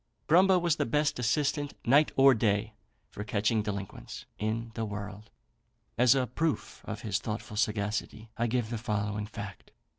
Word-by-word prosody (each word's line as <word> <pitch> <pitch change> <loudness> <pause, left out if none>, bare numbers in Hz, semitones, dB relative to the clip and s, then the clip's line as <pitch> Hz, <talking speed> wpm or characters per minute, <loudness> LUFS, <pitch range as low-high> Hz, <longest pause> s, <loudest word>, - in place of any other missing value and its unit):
Grumbo 185 +4 +5
was 170 -2 +1
the - - 0
best 145 +3 +1
assistant, 145 +4 0
night 145 +5 +5
or 135 0 +7
day, 110 -1 +1 0.4
for 105 - -6
catching 110 +1 +1
delinquents, 100 -2 -6
in 115 +2 -2
the 115 - -3
world. 105 0 -6 0.7
As 125 +2 +5
a 130 -2 +2
proof 150 +6 -2
of - - -5
his 105 -3 -1
thoughtful 105 -1 -5
sagacity, 105 +1 -2
I 120 0 0
give 120 -1 -1
the 115 - -2
following 105 -2 -2
fact. 105 -2 -8
110 Hz, 155 wpm, -30 LUFS, 105-130 Hz, 0.7 s, or